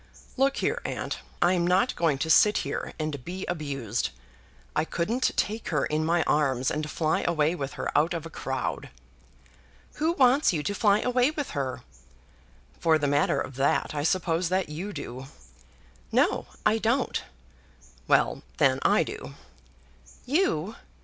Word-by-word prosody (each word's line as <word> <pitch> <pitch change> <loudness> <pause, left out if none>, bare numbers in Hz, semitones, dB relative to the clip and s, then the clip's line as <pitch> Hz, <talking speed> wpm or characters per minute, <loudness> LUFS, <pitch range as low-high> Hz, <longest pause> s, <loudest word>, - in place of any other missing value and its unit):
"Look 270 +1 +2
here, - - 0
aunt, - - -4 0.2
I'm 175 -1 +3
not 185 +8 +2
going 160 -5 +1
to 160 - -2
sit 210 +6 +6
here - - -4
and 155 -4 -4
be 185 +5 -5
abused. 135 - -2 0.7
I 155 - +2
couldn't 220 +11 0
take 215 +2 -1
her 150 -3 +1
in 155 +1 -1
my 165 +1 +2
arms, 135 -5 +1
and 150 0 -3
fly 155 0 0
away 160 -2 +2
with 140 -6 -4
her - - -4
out 165 +4 +3
of 165 -1 -5
a 165 - -8
crowd." - - -3 1.1
"Who 320 +2 +1
wants 270 - +4
you 150 -3 -1
to 205 - -1
fly 205 0 +3
away 250 +1 +2
with 300 -2 -4
her?" 135 -2 -3 1.0
"For 160 -1 +4
the 145 - -1
matter 145 0 +2
of 130 - -5
that, 135 +2 +1
I 145 - -2
suppose 170 +1 +1
that 185 -2 0
you 175 +7 -5
do." 130 -7 -7 0.8
"No, - - +2 0.2
I 220 - +3
don't." 235 +4 0 0.9
"Well, - - +3 0.2
then, - - +3
I - - +4
do." 70 0 -8 0.9
"You! 230 - 0
165 Hz, 155 wpm, -27 LUFS, 150-210 Hz, 1.1 s, sit